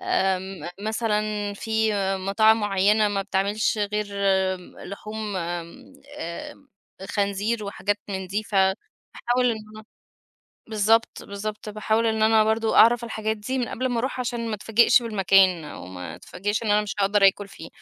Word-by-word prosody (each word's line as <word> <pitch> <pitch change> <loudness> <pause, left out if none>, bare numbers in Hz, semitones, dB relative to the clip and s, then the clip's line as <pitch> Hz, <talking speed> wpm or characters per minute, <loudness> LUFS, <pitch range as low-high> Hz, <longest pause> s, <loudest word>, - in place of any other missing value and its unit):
آمم، 190 -3 -1
مثلًا 210 -1 -1
فيه 220 0 0 0.2
مطاعم 215 +4 +3
معيّنة 205 +1 +3
ما 200 -1 -1
بتعملش 200 +3 0
غير 210 0 -1 0.5
امم، 180 -1 -13
لحوم 210 +1 -6
آمم، 170 +4 -6 0.3
آآآ، 280 - -7 0.4
خنزير 205 +2 -1
وحاجات 205 0 -2
من 190 -1 -4
دي 200 +4 -2
فباحاول 210 +5 -1
إن 225 - -2 0.2
أنا 215 - -11 0.8
بالضبط، 220 +1 +1
بالضبط، 210 +1 -6
باحاول 215 +2 0
إن 220 -1 0
أنا 220 0 +5
برضو 220 +1 +1
أعرف 235 +1 +6
الحاجات 220 -1 -2
دي 255 +5 -3
من 245 - -1
قبل 255 +2 -2
ما 245 -2 -1
أروح 255 +1 -2
عشان 240 -2 -3
ما 220 - -2
أتفاجئش 225 +4 +4
بالمكان 195 -5 +3
أو 90 -11 -9
ما 90 -2 -8
أتفاجئش 205 +4 -3
إن 215 - -1
أنا 210 0 +4
مش 210 - -5
هأقدر 200 0 +4
أكل 200 +1 +1
فيه. 165 - -11
210 Hz, 150 wpm, -24 LUFS, 195-220 Hz, 0.8 s, أعرف